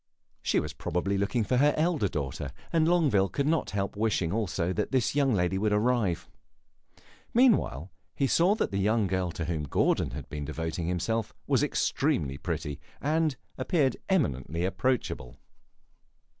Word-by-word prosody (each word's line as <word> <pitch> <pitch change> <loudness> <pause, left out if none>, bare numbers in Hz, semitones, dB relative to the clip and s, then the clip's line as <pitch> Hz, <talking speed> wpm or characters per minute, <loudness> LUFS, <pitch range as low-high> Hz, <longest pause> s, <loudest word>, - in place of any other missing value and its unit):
She - - +2
was 75 -1 -4
probably 90 +5 -1
looking 100 +4 0
for 125 +5 +1
her 145 +3 +4
elder 155 - +2
daughter, 70 -4 -4 0.2
and 160 -1 +3
Longueville 145 - +3
could 140 - -1
not 160 +2 +1
help 100 0 -2
wishing 105 -6 0
also 95 -5 -1
that 105 +2 -1
this 130 -4 +1
young 140 -2 +2
lady 95 -2 +1
would 105 +1 +1
arrive. 105 -4 +1 1.1
Meanwhile, 200 - +3 0.2
he 140 - +1
saw 175 +9 +4
that - - -1
the 100 - -1
young 105 +2 +2
girl 95 -1 0
to 80 - -3
whom 80 -1 -2
Gordon 70 - +1
had - - -7
been 75 -1 -5
devoting 80 +3 -3
himself 105 +6 -1
was - - +2
extremely 70 -2 0
pretty, 75 -1 -3 0.2
and 155 0 +1 0.2
appeared 145 -8 +2
eminently 85 - 0
approachable. 95 - -1
100 Hz, 155 wpm, -28 LUFS, 85-135 Hz, 1.1 s, her